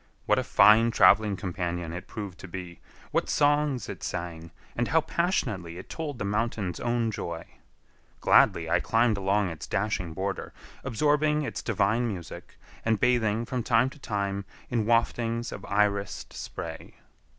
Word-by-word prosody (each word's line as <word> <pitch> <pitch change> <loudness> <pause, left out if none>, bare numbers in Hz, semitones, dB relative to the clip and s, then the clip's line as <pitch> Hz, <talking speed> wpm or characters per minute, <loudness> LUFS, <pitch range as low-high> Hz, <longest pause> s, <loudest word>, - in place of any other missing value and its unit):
What - - +3
a - - -1
fine 110 +2 +6
traveling 105 -3 +5
companion 90 -2 -3
it 90 - -7
proved 100 -5 -7
to - - -9
be, 90 -1 -8 0.3
what - - 0
songs 145 -3 +2
it - - -7
sang, 85 -1 -5 0.3
and 120 0 0
how 160 +1 +3
passionately 115 - -1
it - - -10
told 150 -5 -4
the 105 - -3
mountain's 105 -3 -1
own 120 -1 0
joy! 85 -5 -5 0.7
Gladly - - +4
I - - +3
climbed 115 0 +2
along 100 -1 +1
its 80 - -8
dashing 95 -4 -1
border, 95 +2 -3 0.3
absorbing 150 +4 +2
its - - -4
divine 110 +2 +1
music, 90 -7 -7 0.3
and 110 -2 +1
bathing 115 -2 +2
from 125 +1 -2
time 120 +2 +2
to 150 - -14
time 100 -4 -2 0.3
in 115 -3 0
waftings 115 0 +1
of - - -7
irised 100 0 0
spray. - - -7
105 Hz, 150 wpm, -27 LUFS, 95-120 Hz, 0.7 s, fine